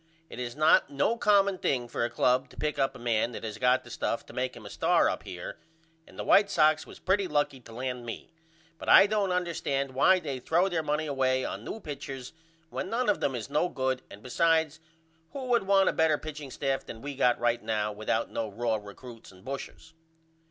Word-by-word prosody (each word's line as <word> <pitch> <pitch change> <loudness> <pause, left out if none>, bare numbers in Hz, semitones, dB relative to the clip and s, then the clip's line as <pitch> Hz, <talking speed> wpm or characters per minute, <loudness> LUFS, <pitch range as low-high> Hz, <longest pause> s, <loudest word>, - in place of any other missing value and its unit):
It - - -8
is 120 -1 -4
not 155 -2 +4
no 145 +11 +1
common 200 -4 +3
thing 125 -3 0
for 120 - -2
a 120 - 0
club 125 +1 +1
to - - -18
pick 150 -1 -2
up 135 0 +1
a - - -8
man 120 -1 0
that - - -7
has 110 -1 -5
got 125 +1 +3
the 120 - -13
stuff 115 - -2
to - - -13
make 125 0 -2
him 110 - -12
a - - -8
star - - +3
up - - -2
here 90 -1 -8 0.5
and - - -16
the - - -3
White 200 0 +5
Sox 155 -3 +3
was - - -12
pretty 190 +1 +1
lucky 145 -4 0
to 115 - -15
land 125 +1 -4
me 115 -1 -7 0.5
but - - -5
I - - +9
don't 205 -2 0
understand 160 -6 -1
why 145 +9 +4
they 140 -6 -5
throw 170 +8 +2
their 170 -3 0
money 150 0 -1
away 130 -3 +1
on 100 - -5
new 220 - -6
pitchers 135 - -7 0.4
when 185 - -4
none 240 +1 0
of 205 - +2
them 135 - 0
is 115 - -5
no 150 +5 +1
good 130 -1 -1
and 100 - -13
besides 160 +3 +1 0.5
who 275 -2 -5
would 235 -5 +2
want 195 -1 +4
a - - +3
better 160 -2 +3
pitching 150 -2 -8
staff 135 0 -2
than 115 - -10
we 145 0 -5
got 125 -2 +2
right 120 0 +1
now 110 -1 -1
without 105 +1 -2
no 110 -1 -3
raw 115 +2 -1
recruts 110 +3 -12
and 95 +3 -18
bushers. 140 +4 -7
135 Hz, 220 wpm, -28 LUFS, 120-160 Hz, 0.5 s, I